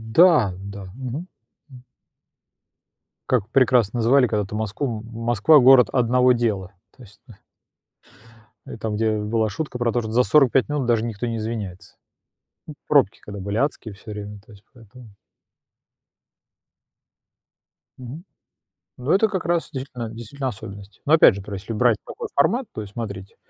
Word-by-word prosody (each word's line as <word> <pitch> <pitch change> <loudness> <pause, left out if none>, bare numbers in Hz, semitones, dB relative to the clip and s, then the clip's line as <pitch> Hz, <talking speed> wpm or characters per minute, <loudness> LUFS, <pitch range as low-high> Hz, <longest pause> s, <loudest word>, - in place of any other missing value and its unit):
Да, 160 - +5
да, 100 -1 -8
мгм, 135 +7 -6 0.4
м. 125 -1 -14 1.5
Как 115 -5 +1
прекрасно 125 -4 +3
называли 125 +3 +4
когда-то 105 -2 -2
Москву: 110 +2 -3
"М 110 - -13
Москва- 120 +6 +4
город 125 -3 +6
одного 125 +1 +3
дела". 100 -6 -2 0.2
То 130 - -15
есть, 105 0 -18
ну 115 - -14 1.3
И - - -9
там, 110 -1 -3
где 110 0 0
была 110 +1 -1
шутка 135 +4 -5
про 120 -1 0
то, 120 - 0
что 110 -1 -6
за 125 +2 +3
45 135 -2 +3
минут 145 -3 -1
даже 115 -2 +1
никто 115 0 -4
не 115 - -3
извиняется. 110 -5 -6 0.9
Пробки 140 -9 +3
когда 100 -1 -9
были 100 +2 -3
адские 130 -5 -2
всё 100 +2 -11
время, 105 0 -8
то 105 - -20
есть 100 0 -18
поэтому. 120 0 -16 2.9
Мгм, 130 +7 -9 0.7
ну 125 +4 -2
это 210 +3 +4
как 190 -5 -3
раз, 170 0 0
действительно 125 -4 -6
действительно 120 +4 -5
особенность, 100 -1 -11
но 150 - +2
опять 155 -10 +7
же, 100 - -6
пр 100 +1 -9
если 100 +4 -6
брать 115 -1 +3
такой - - -7
формат, 235 - +2
то - - -5
есть 100 -1 -10
смотрите, 100 -4 -7
115 Hz, 155 wpm, -22 LUFS, 105-130 Hz, 2.9 s, опять